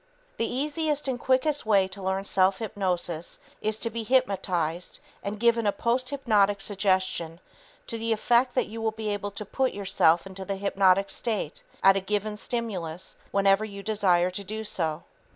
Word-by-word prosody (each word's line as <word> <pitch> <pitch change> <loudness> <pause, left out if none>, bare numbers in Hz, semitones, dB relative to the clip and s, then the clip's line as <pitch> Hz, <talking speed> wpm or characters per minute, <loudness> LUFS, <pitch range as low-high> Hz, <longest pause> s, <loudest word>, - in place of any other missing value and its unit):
The 230 - -1
easiest 295 +2 -1
and 255 -2 -1
quickest 265 +4 +2
way 200 -3 +3
to 195 +1 -10
learn 190 +1 -1
self 190 0 +3
hypnosis 180 -6 -2 0.2
is 215 0 0
to 230 +1 -1
be 230 - -3
hypnotized 190 -9 0 0.2
and 200 +1 -4
given 235 -1 +3
a - - +4
posthypnotic 235 -4 +1
suggestion 185 -4 0 0.5
to 230 - -5
the 230 0 -1
effect 240 +3 +2
that - - +2
you 225 +1 -7
will 225 - +1
be 220 -1 -4
able 205 0 -2
to 200 +1 -7
put 260 +5 0
yourself 180 -4 +3
into 190 0 -7
the 195 +1 -3
hypnotic 195 0 +2
state 240 - -2 0.2
at 195 0 +7
a - - 0
given 210 +2 -2
stimulus 190 -7 -4
whenever 195 +1 +3
you 200 -2 -7
desire 185 -5 +2
to 200 +2 -5
do 215 +3 -5
so. 160 -7 -2
205 Hz, 170 wpm, -27 LUFS, 190-230 Hz, 0.5 s, at